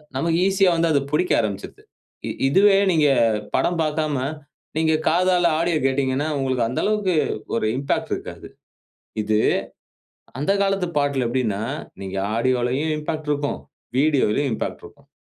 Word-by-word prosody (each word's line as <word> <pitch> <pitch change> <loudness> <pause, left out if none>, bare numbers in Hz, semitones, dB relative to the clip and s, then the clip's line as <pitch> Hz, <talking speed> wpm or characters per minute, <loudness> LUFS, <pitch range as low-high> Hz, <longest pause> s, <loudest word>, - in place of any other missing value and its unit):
நமக்கு 165 +5 +1
ஈசியா 195 -1 +3
வந்து 165 0 +2
அது 145 - +3
புடிக்க 180 +4 +1
ஆரம்பிச்சுடுது. 100 -3 -4 0.4
இ - - -2 0.2
இதுவே 195 +7 +5
நீங்க 155 -3 +3 0.5
படம் 175 -1 +1
பார்க்காம 155 -1 -1 0.6
நீங்க 160 0 +2 0.2
காதால 175 0 +3
ஆடியோ 170 -1 +1
கேட்டீங்கன்னா, 135 +1 0
உங்களுக்கு 130 -3 0
அந்த 125 - -3
அளவுக்கு 210 -4 +1 0.4
ஒரு 115 - 0
இம்பாக்ட் 140 +1 -2
இருக்காது. - - -9 0.7
இது 105 0 +1 1.0
அந்த 150 +8 +1
காலத்து 195 -2 0
பாட்டுல 140 -3 0
எப்படின்னா 115 -5 -1 0.4
நீங்க 95 0 -5 0.2
ஆடியோவும் 130 +5 0
இம்பாக்ட் 155 0 -4
இருக்கும். 145 0 -2 0.4
வீடியோலயும் 140 -2 +2
இம்பாக்ட் - - -4
இருக்கும். - - -15
150 Hz, 130 wpm, -22 LUFS, 130-170 Hz, 1.0 s, இதுவே